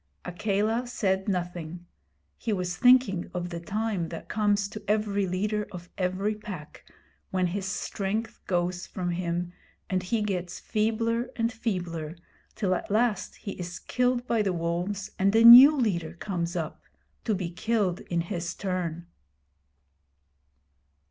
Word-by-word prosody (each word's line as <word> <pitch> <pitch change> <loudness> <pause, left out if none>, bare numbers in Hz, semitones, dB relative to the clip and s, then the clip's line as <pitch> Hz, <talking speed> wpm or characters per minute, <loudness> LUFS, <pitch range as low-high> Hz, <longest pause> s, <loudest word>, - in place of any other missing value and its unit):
Akela 215 +6 0
said 190 -5 0
nothing. 175 -2 -4 0.5
He 225 - -3
was 180 -3 -1
thinking 245 -8 +4
of 175 0 -2
the 170 -1 -5
time 200 -1 -2
that 165 - -8
comes 205 -1 +1
to 215 - -8
every 205 -2 +1
leader 210 +4 -1
of 175 -2 -9
every 190 +3 0
pack 195 -8 -9 0.5
when 185 -1 +1
his 190 +2 -2
strength 210 +2 -3
goes 180 -1 -1
from 175 -1 -3
him 175 0 -2 0.4
and 185 -1 +1
he 210 +4 -1
gets 180 -4 -3
feebler 230 +2 0
and 230 +1 0
feebler, 175 -9 -3 0.4
till 195 -4 +1
at - - -3
last 215 -2 +1
he 200 - -7
is 175 0 -5
killed 250 +3 0
by 230 -3 +1
the 195 -3 0
wolves 175 +4 -2
and 195 +2 +3
a 225 - +6
new 255 +6 +11
leader 170 - 0
comes 175 -2 -3
up 160 -3 -4 0.4
to 220 - +1
be 180 -3 -3
killed 195 -1 0
in 170 -1 -2
his 170 0 -4
turn. 175 -3 -3
190 Hz, 140 wpm, -27 LUFS, 175-215 Hz, 0.5 s, new